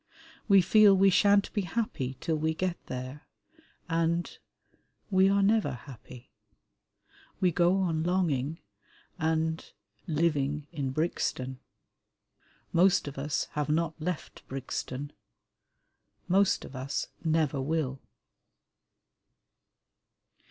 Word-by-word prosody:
We 195 -3 +6
feel 205 +2 +6
we 195 +1 +5
shan't 200 +1 +4
be 210 - 0
happy 165 - -3
till 160 - -1
we 160 +1 -1
get 180 0 -2
there, 130 +3 -7 0.6
and... 165 0 0 0.8
we 190 0 +5
are 200 0 +3
never 205 - +2
happy. 125 0 -12 1.1
We 180 -2 +3
go 175 +2 +3
on 165 -4 0
longing 165 -5 0 0.6
and... 160 0 0 0.4
living 150 -2 0
in 145 -5 -3
Brixton. 130 -3 -2 1.1
Most 180 -2 +4
of 140 -1 -6
us 145 +2 -1
have 150 0 -2
not 160 +1 +1
left 175 -2 -4
Brixton; 135 +1 -5 1.1
most 195 +2 +2
of 135 - -11
us 130 +2 -3
never 155 -4 +1
will. 135 -2 -2
160 Hz, 100 wpm, -29 LUFS, 140-180 Hz, 1.1 s, We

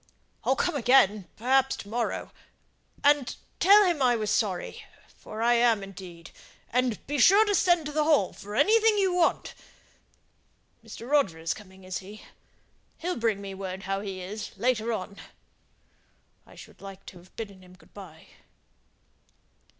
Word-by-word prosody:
"I'll 265 - +2
come - - -1
again, 225 -7 +3
perhaps 265 +3 +2
to - - -10
morrow. 230 +2 -3 0.7
And 285 -3 +3 0.2
tell 405 +3 +7
him 345 -6 0
I 245 -2 +4
was 215 -2 -2
sorry; 195 -6 -2 0.3
for 215 +1 -7
I 240 +1 +4
am 235 -3 +3
indeed. 180 -4 -11 0.4
And 250 -3 -1
be 290 +1 -2
sure 400 - +6
and 410 -1 +1
send 350 -4 +3
to 300 - -4
the 305 +1 +1
Hall 300 - +2
for 205 +1 -9
anything 435 - +4
you 380 -2 +2
want! 355 -2 +1 1.3
Mr. 235 - -10
Roger 280 - +2
is 165 +1 -2
coming, 190 -2 -15
is 185 0 -4
he? 205 +3 -12 0.7
He'll 360 +2 -3
bring 225 -4 -1
me 195 -1 -7
word 190 0 -6
how 195 0 -2
he 195 -2 -6
is, 205 +3 -7
later 235 0 0
on. 200 -2 -5 1.3
I - - -16
should - - -14
like 195 -1 -11
to 180 - -11
have 180 +2 -21
bidden 200 -4 -8
him 180 0 -17
good - - -23
by." 175 -6 -12
220 Hz, 160 wpm, -27 LUFS, 195-285 Hz, 1.3 s, tell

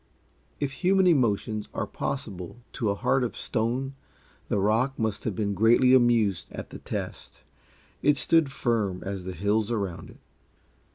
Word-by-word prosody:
If 145 -2 -1
human 190 +1 +4
emotions 110 - +1
are - - -1
possible 90 +3 -5 0.2
to 110 - -1
a 100 - +1
heart 130 +5 +1
of 120 - -3
stone, 125 +4 -1 0.5
the - - 0
rock 110 +7 +1
must 110 -3 -2
have 110 - -1
been 100 0 -1
greatly 120 +5 +5
amused 115 -8 +3
at - - -8
the - - -8
test. - - -6 0.6
It 145 -1 +3
stood 160 -1 +3
firm 110 -8 -1
as 95 -2 -4
the 95 - -4
hills 105 +4 +1
around 100 -7 -3
it. - - -16
110 Hz, 155 wpm, -27 LUFS, 100-130 Hz, 0.6 s, greatly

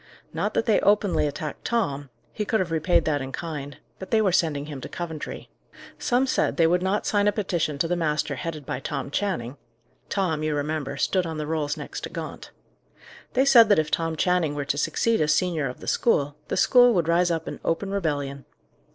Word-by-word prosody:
Not - - -2
that - - +1
they 220 - +4
openly 205 -6 +2
attacked 150 +1 -5
Tom; 145 - -1 0.2
he 210 - -2
could 220 +1 0
have 180 -3 -2
repaid 165 +1 +2
that 145 -3 0
in 135 0 -5
kind; 145 -3 -6 0.2
but 190 - -8
they 225 - +3
were 205 -4 +3
sending 155 -5 +1
him 145 -3 -7
to - - -7
Coventry. 165 -3 -6 0.5
Some 250 +2 +2
said 260 - 0
they 165 - +5
would 175 +2 +3
not 190 +3 0
sign 205 -1 +2
a - - +5
petition 175 -8 -1
to 165 - 0
the 175 - 0
master 155 -3 0
headed 160 -5 -5
by 125 - -3
Tom 140 - -4
Channing: 145 - -2 0.5
Tom, 175 -6 0
you 155 -1 0
remember, 145 -1 -3
stood 180 +5 +1
on 160 -1 -5
the 150 - -3
rolls 150 -1 -2
next - - -6
to - - -7
Gaunt. - - -7 0.8
They 265 +1 +3
said 235 -5 +7
that 205 - +5
if 155 -1 0
Tom 165 -1 0
Channing 175 -3 +1
were 145 -1 -3
to 140 - -1
succeed 230 +6 +1
as 150 0 +3
senior 165 -7 0
of 125 - -10
the - - -9
school, 145 -11 +1
the - - -2
school 245 -2 +6
would 170 -3 +1
rise 175 +1 +3
up 165 -1 -2
in - - -6
open 195 +4 -1
rebellion. 145 -7 -2
165 Hz, 210 wpm, -25 LUFS, 145-195 Hz, 0.8 s, said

